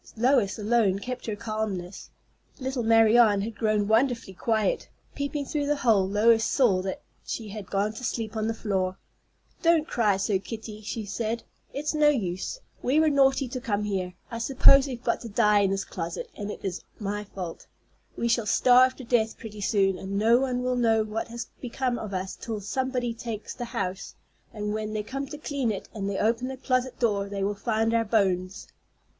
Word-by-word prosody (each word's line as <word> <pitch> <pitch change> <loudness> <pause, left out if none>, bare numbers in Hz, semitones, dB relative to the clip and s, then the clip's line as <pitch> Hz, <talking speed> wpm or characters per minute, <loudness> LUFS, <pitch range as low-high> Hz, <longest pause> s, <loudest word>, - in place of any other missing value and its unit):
Lois 240 -4 +3
alone 215 -3 +2
kept 250 +5 -6
her 215 - -2
calmness. 205 -4 -4 0.5
Little 260 -1 -2
Marianne 225 -2 +5
had 220 +2 -4
grown 215 -2 +1
wonderfully 230 -2 +1
quiet. 220 - 0 0.2
Peeping 285 0 -3
through 290 0 -2
the 295 - +2
hole, 215 -8 +3
Lois 225 +2 +4
saw 215 -9 +3
that 190 0 -5 0.2
she 220 -3 -5
had 205 -2 -8
gone 205 +2 0
to 235 - -9
sleep 225 -2 -3
on 215 0 -1
the 225 - 0
floor. 190 -4 -1 0.6
"Don't 330 -2 +3
cry 210 -5 +2
so, 195 0 +1
Kitty," 215 +1 -8
she 220 +1 -4
said. 225 +3 -3 0.3
"It's 295 +3 -2
no 300 -1 +4
use. 195 - -2 0.2
We 275 +5 +2
were 315 -1 +4
naughty 270 -1 +3
to 255 +1 -5
come 210 -3 -1
here. 185 -3 -2 0.2
I 230 - -4
suppose 270 +3 +6
we've 250 -2 -6
got 235 - 0
to 230 - -7
die 210 -1 +4
in 200 -1 +3
this 195 0 -1
closet, 170 -1 -5
and 205 0 -5
it 210 - -7
is 185 -2 -3 0.2
my 205 0 -3
fault. 185 -4 -7 0.5
We 235 - 0
shall 230 -2 +1
starve 255 +3 +5
to 265 - -10
death 230 -2 +1
pretty 215 -2 -9
soon, 195 -2 +2
and 195 +1 -4
no 230 +4 +5
one 250 -2 -1
will 250 0 0
know 225 -2 +3
what 215 +1 -4
has 235 +1 -6 0.2
become 250 0 -2
of 215 - -6
us 190 0 -3
till 225 -3 -5
somebody 250 +4 -2
takes 230 -2 -6
the 245 - -5
house; 190 -5 -4 0.4
and 210 -1 -3
when 215 0 -3
they 215 -1 -2
come 275 +5 -4
to 295 - -7
clean 280 -5 -1
it 200 - -6
and 200 -2 -3
they 195 - -2
open 230 +4 +1
the 265 0 -5
closet 255 -1 -1
door, 200 -4 0
they 200 -1 -3
will 200 +1 0
find 225 +2 0
our 230 0 +3
bones." 190 -4 0
220 Hz, 195 wpm, -27 LUFS, 200-245 Hz, 0.6 s, suppose